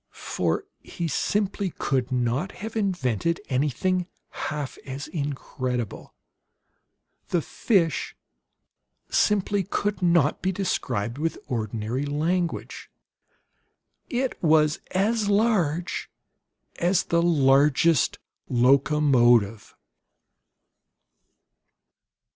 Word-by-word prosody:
For 85 -2 0 0.2
he 170 - -5
simply 200 +5 -1
could 130 -1 -1
not 125 +8 -1
have 220 +2 -7
invented 170 - 0
anything 150 +7 0 0.2
half 150 -3 -4
as 135 +1 -6
incredible. 130 - -4 1.1
The 170 -3 0
fish 170 - 0 1.0
simply 205 -1 +2
could 200 +1 -2
not 170 -4 +3
be 190 - +1
described 130 - -2
with 165 +1 -1
ordinary 115 +1 -3
language. 165 +4 -2 1.2
IT 255 0 -2
WAS 155 -2 +3
AS 205 +3 +1
LARGE 195 -6 +1 0.7
AS 180 +1 +2
THE 170 0 +1
LARGEST 145 -1 +3 0.3
LOCOMOTIVE. 125 -4 +3
155 Hz, 80 wpm, -25 LUFS, 130-185 Hz, 1.2 s, not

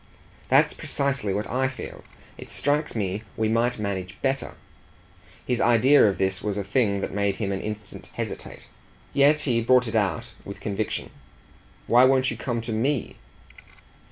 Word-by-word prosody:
"That's - - +4
precisely 140 -7 -1
what 100 +2 -2
I 130 +2 0
feel. 130 0 -8 0.3
It - - -11
strikes 145 0 0
me 100 -1 -2 0.2
we 110 - +1
might 115 +2 +1
manage 100 -2 -4
better." 135 0 -1 0.9
His 125 -2 0
idea 120 +2 +5
of 100 - 0
this 95 0 0
was 105 -1 -2
a 100 - -1
thing 100 -1 +1
that - - -4
made 100 -1 0
him 100 -2 -2
an 95 - -2
instant 105 0 -7
hesitate; - - -6 0.5
yet 145 +2 +5
he 120 -4 +1
brought 125 +1 +4
it 110 - -4
out 105 -4 0
with - - -8
conviction. 105 +1 -3 0.7
"Why 120 +2 +5
won't 130 0 +3
you - - -4
come 120 -3 -2
to 115 - -5
ME?" 120 +3 -1
115 Hz, 160 wpm, -25 LUFS, 100-130 Hz, 0.9 s, idea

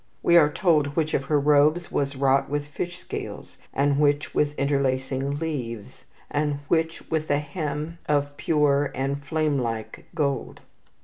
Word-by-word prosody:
We 170 - +4
are 150 -3 +6
told 150 -6 +2
which 155 -2 0
of 135 - 0
her 150 +1 +2
robes 150 +4 +3
was 140 0 -1
wrought 135 0 +2
with 145 0 -1
fish 175 +4 -5
scales, - - -7
and 140 0 +1
which 145 0 +2
with 150 0 +1
interlacing 135 0 0
leaves, 125 -9 -5 0.3
and 145 0 0
which 165 0 0
with 155 -1 -1
a 145 - +3
hem 150 +2 -4
of 145 -1 +1
pure 145 -2 +2
and 140 +2 -2
flame 155 -1 0
like 115 -3 -4
gold. 140 -5 -2
145 Hz, 150 wpm, -25 LUFS, 140-155 Hz, 0.3 s, are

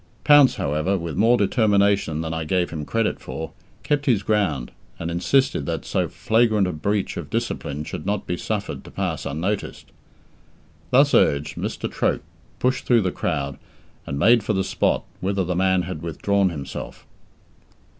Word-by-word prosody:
Pounce, 145 -3 +7
however, 75 +7 0
with 85 -3 -5
more 115 +6 +4
determination 100 -6 +2
than 80 0 -3
I 80 0 -2
gave 90 +2 0
him 75 -3 -5
credit 115 -1 0
for, 75 +5 -6 0.3
kept 145 -1 0
his 110 -6 +3
ground, 90 - 0 0.3
and 85 0 -4
insisted 90 - +1
that - - -3
so - - 0
flagrant 110 -3 +2
a 90 - -1
breach 100 +6 -1
of - - -6
discipline 70 +2 -3
should 75 - -6
not 100 +1 -2
be 90 - -2
suffered 105 +3 -4
to - - -12
pass - - -3
unnoticed. 90 +9 -3 1.0
Thus - - +4
urged, 70 +1 +3
Mr. - - -3
Troke - - -1 0.3
pushed 130 +1 0
through 120 -2 +5
the 95 -2 0
crowd, 70 -6 -2 0.5
and 70 - -3
made 115 +9 +5
for 110 - 0
the 95 -1 +1
spot - - 0 0.2
whither 95 0 0
the 90 0 -2
man 95 0 +2
had 85 -3 -6
withdrawn 95 +4 +1
himself. 75 -5 -7
95 Hz, 165 wpm, -23 LUFS, 80-105 Hz, 1.0 s, Pounce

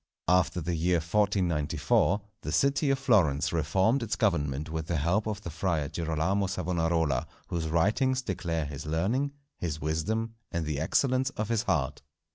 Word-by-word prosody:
After 90 0 +3
the 85 +2 -2
year 85 +2 +2
1494, 85 -1 +1 0.2
the - - -4
city 140 +1 +2
of 135 - +3
Florence 85 - +2
reformed 95 - +2
its 115 -1 -1
government 75 -8 0
with 80 -1 -3
the 85 -2 0
help 90 +9 +1
of 105 -1 -3
the 85 - -6
Friar 80 -3 -1
Girolamo 85 +4 0
Savonarola, 80 -7 0 0.2
whose 85 -2 -2
writings 110 +10 +2
declare 85 -6 -2
his 75 +1 -7
learning, 105 - 0 0.3
his 80 -3 -3
wisdom, 95 +10 -1 0.2
and 85 -3 -2
the 75 -2 -2
excellence 130 - +2
of 110 0 -2
his 115 -2 +2
heart. 75 - -1
85 Hz, 155 wpm, -29 LUFS, 80-105 Hz, 0.3 s, After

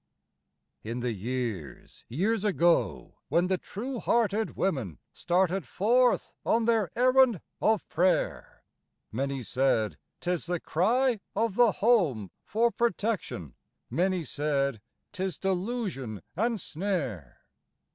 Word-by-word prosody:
In 115 +3 -4
the 120 0 -1
years, 110 - -5
years 195 - 0
ago, 175 -5 +1
when 175 +1 +3
the 185 -1 +1
true 245 +5 -5
hearted 220 -2 +1
women, 130 - -1 0.2
Started 180 +1 +1
forth 240 - +2
on 230 0 +2
their 225 -5 +2
errand 255 -3 +4 0.2
of 220 -2 +2
prayer, 180 +2 0 0.5
Many 135 +2 -2
said, 120 -3 +1 0.2
"'Tis 175 -2 -2
the 175 -1 -1
cry 235 +10 +2 0.2
of 225 0 +1
the 235 0 +4
Home 170 - +2
for 230 +2 +1
protection"; 205 - -2 0.4
Many 185 0 +1
said, 140 -4 -1 0.3
"'Tis 190 0 -3
delusion 185 - -2
and 225 +4 0
snare." 150 - -3
185 Hz, 110 wpm, -28 LUFS, 135-225 Hz, 0.5 s, errand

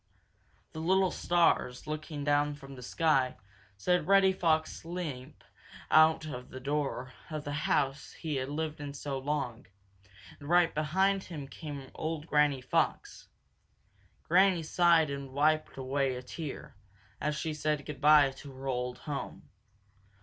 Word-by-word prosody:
The 160 - -7
little 185 +3 +2
stars, 170 -7 +1
looking 155 -1 -5
down 145 0 +2
from 140 -1 -11
the 130 - -10
sky, 135 -1 +1 0.4
saw 180 - +2
Reddy 195 0 +5
Fox 160 -4 0
limp 155 -6 -6 0.5
out 155 +1 +6 0.3
the 130 - -8
door 135 -2 -2 0.2
of 155 -2 -4
the 145 - -5 0.2
house 135 +1 0
he 155 -4 -3
had 130 +1 -3
lived 155 +1 -3
in 145 -1 -6
so 140 -1 -4
long, 135 -4 -3 0.7
and 145 - -9
right 175 -1 +4
behind 190 +6 +1
him 150 -6 -7
came 140 -2 -8
old 155 -1 -4
Granny 150 -4 +2
Fox. - - -1 1.0
Granny 180 0 +4
sighed 165 -2 +4
and 140 -1 -6
wiped 155 +2 +1
away 135 0 0
a 125 - -7
tear, 145 +2 -7 0.4
as 150 0 -1
she 155 +1 -3
said 150 -1 -1
good 150 -1 -7
by 150 -2 +6
to 135 +1 -11
her 135 +1 -10
old 125 -1 -2
home. 145 -2 -6
150 Hz, 140 wpm, -31 LUFS, 135-160 Hz, 1.0 s, out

